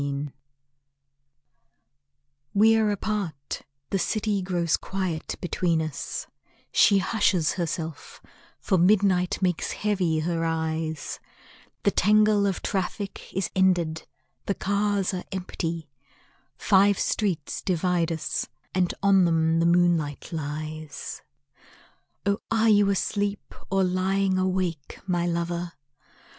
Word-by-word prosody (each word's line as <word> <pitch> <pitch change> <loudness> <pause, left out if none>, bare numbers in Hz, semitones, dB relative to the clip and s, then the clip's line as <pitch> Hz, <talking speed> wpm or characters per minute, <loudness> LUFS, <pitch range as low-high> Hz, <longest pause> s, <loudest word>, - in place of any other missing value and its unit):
AT - - -1
NIGHT 140 0 -3 2.2
WE 220 +2 +6
are 220 -1 +3
apart; 195 -9 -3 0.3
the 195 - +1
city 210 0 0
grows 175 -3 +1
quiet 185 -5 -3
between 175 -2 0
us, 155 -3 -4 0.5
She 200 - +5
hushes 190 -5 +2
herself, 165 -3 -4 0.4
for 190 - +1
midnight 185 -1 +3
makes 180 -3 0
heavy 185 -7 0
her 165 0 -1
eyes, 160 -1 -2 0.6
The - - +4
tangle 210 +1 +4
of 195 - -2
traffic 195 +1 -3
is 190 -2 -2
ended, 175 -4 +2 0.4
the 200 - +1
cars 200 -1 0
are 180 - -3
empty, 170 -4 -4 0.7
Five 200 -1 +4
streets 180 -9 -1
divide 175 -1 +1
us, 160 -1 -2 0.3
and 180 -1 +2
on 195 -2 +5
them 165 -1 +2
the 165 - +3
moonlight 170 -4 +2
lies. 155 -1 -5 1.0
Oh 200 +1 +1
are 225 0 +3
you 205 -1 +5
asleep, 200 +1 -1 0.2
or 195 0 +2
lying 185 +1 +1
awake, 185 -5 -2
my 175 -2 0
lover? 170 0 -2
180 Hz, 110 wpm, -26 LUFS, 165-200 Hz, 2.2 s, WE